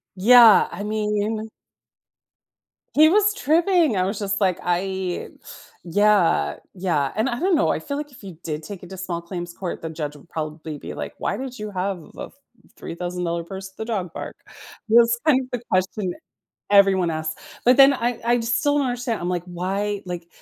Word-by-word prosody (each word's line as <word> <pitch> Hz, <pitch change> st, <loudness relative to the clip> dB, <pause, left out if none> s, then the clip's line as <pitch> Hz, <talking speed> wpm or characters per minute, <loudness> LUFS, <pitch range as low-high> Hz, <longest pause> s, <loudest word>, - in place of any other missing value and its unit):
Yeah, 230 Hz, +3 st, +7 dB
I 205 Hz, -, -6 dB
mean 215 Hz, +1 st, -2 dB, 1.5 s
he 310 Hz, +1 st, +7 dB
was 420 Hz, +2 st, +3 dB
tripping, 330 Hz, -, +2 dB
I 185 Hz, -, +2 dB
was 195 Hz, +3 st, -2 dB
just 200 Hz, -1 st, -1 dB
like, 185 Hz, -3 st, +2 dB
"I" 185 Hz, 0 st, -2 dB, 0.5 s
yeah, 175 Hz, -, +2 dB, 0.2 s
yeah, 170 Hz, -7 st, 0 dB
and 220 Hz, +5 st, +1 dB
I 240 Hz, -1 st, -3 dB
don't 370 Hz, -1 st, +2 dB
know, 315 Hz, -, +2 dB
I -, -, 0 dB
feel 280 Hz, 0 st, -5 dB
like 295 Hz, -1 st, -6 dB
if 245 Hz, -, -16 dB
you 180 Hz, -5 st, -9 dB
did 155 Hz, -1 st, -4 dB
take 195 Hz, +3 st, -8 dB
it 180 Hz, -, -11 dB
to 190 Hz, -, -8 dB
small 175 Hz, -2 st, -4 dB
claims 175 Hz, 0 st, -6 dB
court, 180 Hz, -1 st, -5 dB
the 165 Hz, -, -5 dB
judge 150 Hz, -2 st, -5 dB
would 150 Hz, +3 st, -17 dB
probably 155 Hz, 0 st, -5 dB
be -, -, -8 dB
like, -, -, -6 dB
"Why -, -, -2 dB
did 255 Hz, -1 st, -6 dB
you 210 Hz, 0 st, -5 dB
have 190 Hz, 0 st, -2 dB, 0.2 s
a -, -, -5 dB
f -, -, -17 dB, 0.4 s
$3,000 175 Hz, -1 st, -4 dB
purse 190 Hz, +2 st, -8 dB
at 190 Hz, -, -30 dB
the 220 Hz, -, -4 dB
dog 190 Hz, -7 st, -3 dB
park?" -, -, -7 dB, 0.5 s
That's 235 Hz, +1 st, +5 dB
kind 280 Hz, -4 st, +4 dB
of 255 Hz, -, -9 dB
the 245 Hz, -2 st, -3 dB
question 185 Hz, 0 st, 0 dB, 0.6 s
everyone 195 Hz, -3 st, +5 dB
asks, 155 Hz, 0 st, -4 dB, 0.2 s
but 250 Hz, +1 st, +6 dB
then 275 Hz, 0 st, +8 dB
I 240 Hz, -1 st, -2 dB
I 240 Hz, +1 st, +2 dB
still 265 Hz, +5 st, +1 dB
don't 280 Hz, -3 st, +1 dB
understand, 245 Hz, -2 st, -2 dB
I'm 175 Hz, -, -2 dB
like, 175 Hz, -1 st, -2 dB
"Why" 195 Hz, +3 st, -3 dB
like, 175 Hz, -1 st, -6 dB
195 Hz, 190 wpm, -23 LUFS, 175-240 Hz, 1.5 s, then